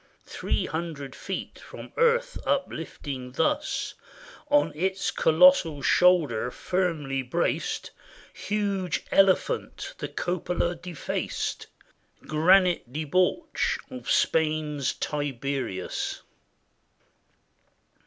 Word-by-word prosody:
Three -, -, -2 dB
hundred 155 Hz, -5 st, -5 dB
feet -, -, -6 dB
from -, -, -11 dB
earth 480 Hz, +1 st, +2 dB
uplifting 145 Hz, -, -3 dB
thus 295 Hz, -, 0 dB, 0.6 s
On 290 Hz, 0 st, +4 dB
its 190 Hz, +5 st, -1 dB
colossal 160 Hz, -2 st, +5 dB
shoulder 160 Hz, -11 st, +4 dB
firmly 155 Hz, -5 st, -1 dB
braced, 125 Hz, -, -1 dB, 0.4 s
Huge 200 Hz, -3 st, -2 dB
elephant, 195 Hz, -, +2 dB
the -, -, -3 dB
cupola 175 Hz, 0 st, -1 dB
defaced. 170 Hz, -2 st, -4 dB, 0.6 s
Granite 175 Hz, -2 st, +3 dB
debauch 155 Hz, +6 st, 0 dB
of 125 Hz, -1 st, -7 dB
Spain's 155 Hz, -3 st, +1 dB
Tiberius. 135 Hz, -8 st, -3 dB
165 Hz, 75 wpm, -27 LUFS, 140-185 Hz, 0.6 s, colossal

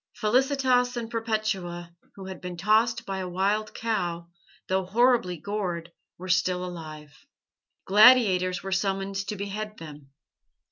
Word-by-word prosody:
Felicitas 250 Hz, +1 st, +2 dB
and 235 Hz, -1 st, -5 dB
Perpetua, 215 Hz, -7 st, -3 dB, 0.2 s
who 195 Hz, -, -9 dB
had 190 Hz, -1 st, -8 dB
been 180 Hz, -1 st, -6 dB
tossed 215 Hz, +5 st, +2 dB
by 195 Hz, -1 st, -4 dB
a 185 Hz, -1 st, -4 dB
wild 200 Hz, +4 st, -1 dB
cow, 175 Hz, -7 st, -2 dB, 0.4 s
though 190 Hz, 0 st, 0 dB
horribly 220 Hz, -2 st, +2 dB
gored, 175 Hz, -2 st, -4 dB, 0.3 s
were 185 Hz, -, -9 dB
still 180 Hz, +1 st, +1 dB
alive. 155 Hz, -4 st, -9 dB, 0.7 s
Gladiators 195 Hz, -5 st, +5 dB
were 195 Hz, -, -5 dB
summoned 195 Hz, 0 st, -1 dB
to 210 Hz, -, -3 dB
behead 210 Hz, +2 st, -5 dB
them. 150 Hz, -3 st, -11 dB
195 Hz, 130 wpm, -26 LUFS, 180-215 Hz, 0.7 s, Gladiators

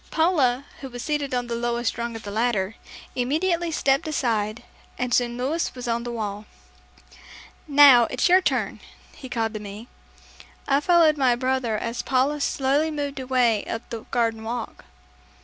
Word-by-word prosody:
Paula, 280 Hz, -6 st, +2 dB
who 270 Hz, -, -7 dB
was 245 Hz, 0 st, -7 dB
seated 295 Hz, -2 st, -2 dB
on 245 Hz, 0 st, -1 dB
the 240 Hz, -, -5 dB
lowest 235 Hz, 0 st, -1 dB
rung 235 Hz, -1 st, -4 dB
of 225 Hz, -, -8 dB
the 205 Hz, -, -6 dB
ladder, 215 Hz, -3 st, 0 dB, 0.4 s
immediately 335 Hz, +7 st, 0 dB
stepped 275 Hz, -2 st, +1 dB
aside 225 Hz, -7 st, -1 dB, 0.3 s
and 250 Hz, -1 st, -2 dB
soon 240 Hz, -1 st, +1 dB
Louis 285 Hz, +7 st, -1 dB
was 250 Hz, -1 st, -6 dB
on 235 Hz, 0 st, 0 dB
the 240 Hz, -, -4 dB
wall. 210 Hz, -2 st, -5 dB, 1.2 s
"Now, 280 Hz, -5 st, +8 dB
it's 255 Hz, -, 0 dB
your 370 Hz, +1 st, +6 dB
turn," -, -, -1 dB, 0.3 s
he 260 Hz, -, -10 dB
called 225 Hz, -2 st, -1 dB
to 215 Hz, -, -4 dB
me. 210 Hz, +3 st, -9 dB, 0.8 s
I 275 Hz, 0 st, +3 dB
followed 320 Hz, -1 st, +4 dB
my 255 Hz, -3 st, +4 dB
brother 255 Hz, -3 st, -1 dB
as 230 Hz, +2 st, -3 dB
Paula 275 Hz, +3 st, +1 dB
slowly 280 Hz, +3 st, +1 dB
moved 285 Hz, -2 st, -4 dB
away 250 Hz, -5 st, +1 dB
up 225 Hz, -, -5 dB
the 230 Hz, -, -4 dB
garden 230 Hz, -2 st, 0 dB
walk. 230 Hz, +1 st, -5 dB
245 Hz, 165 wpm, -24 LUFS, 230-280 Hz, 1.2 s, Now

